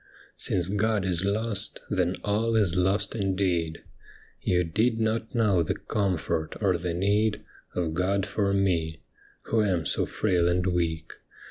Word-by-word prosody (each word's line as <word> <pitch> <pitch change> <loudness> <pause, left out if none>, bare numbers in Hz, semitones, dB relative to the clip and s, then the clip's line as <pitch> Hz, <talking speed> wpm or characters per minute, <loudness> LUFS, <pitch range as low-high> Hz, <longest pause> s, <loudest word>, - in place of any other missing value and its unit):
' - - -26
Since 90 -1 +3
God 105 0 +1
is 90 -1 0
lost, 105 0 -1
then 90 0 0
all 110 +3 0
is 100 -6 +2
lost 95 +3 +1
indeed. 95 -5 -1 0.6
You 90 -1 +2
did 110 +8 +1
not 110 +1 -1
know 105 -6 +3
the 80 - -1
comfort 90 -6 -2
or 95 -4 +2
the 85 0 -3
need 105 +3 +1 0.3
Of 85 -3 -1
God 95 +3 0
for 100 0 0
me, 85 -5 0 0.4
who 115 - +1
am 90 -6 0
so - - +2
frail 90 -5 +1
and 90 0 +1
weak. 85 -3 -1
95 Hz, 150 wpm, -27 LUFS, 85-105 Hz, 0.6 s, Since